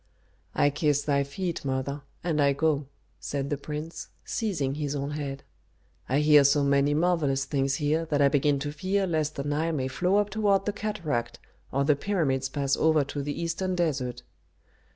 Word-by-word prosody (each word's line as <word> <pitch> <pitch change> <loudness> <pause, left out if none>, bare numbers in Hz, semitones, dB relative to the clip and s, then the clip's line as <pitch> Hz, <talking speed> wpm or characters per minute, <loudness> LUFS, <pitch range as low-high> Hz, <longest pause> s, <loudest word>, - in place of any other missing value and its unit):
"I 145 - +3
kiss 145 0 +1
thy 140 -1 +2
feet, 170 +5 -4
mother, 135 +1 -2 0.2
and 160 -3 +1
I 140 -1 +4
go," 150 -1 0 0.3
said 140 0 -3
the - - +2
prince, 150 +3 -6 0.2
seizing 160 -12 -1
his 145 -1 -3
own 140 +1 -3
head. 140 -2 -5 0.7
"I 135 +3 +2
hear 150 -1 +7
so 140 +1 +4
many 140 +1 +3
marvellous 150 -5 +1
things 135 -1 0
here 155 +3 0
that 150 -2 0
I 140 - +6
begin 145 +1 +2
to 145 0 -3
fear 190 +6 0
lest 155 -4 -1
the 140 - -3
Nile 150 +3 -1
may 130 -4 -1
flow 180 +8 0
up 205 0 +2
toward 200 -2 +2
the 210 - -1
cataract, 170 - -3 0.3
or 140 +1 +1
the 145 +1 +4
pyramids 140 -7 0
pass 140 0 0
over 155 -2 +3
to 140 +1 -5
the 145 +1 -4
eastern 170 +2 -1
desert." 135 -8 -1
145 Hz, 180 wpm, -27 LUFS, 140-165 Hz, 0.7 s, hear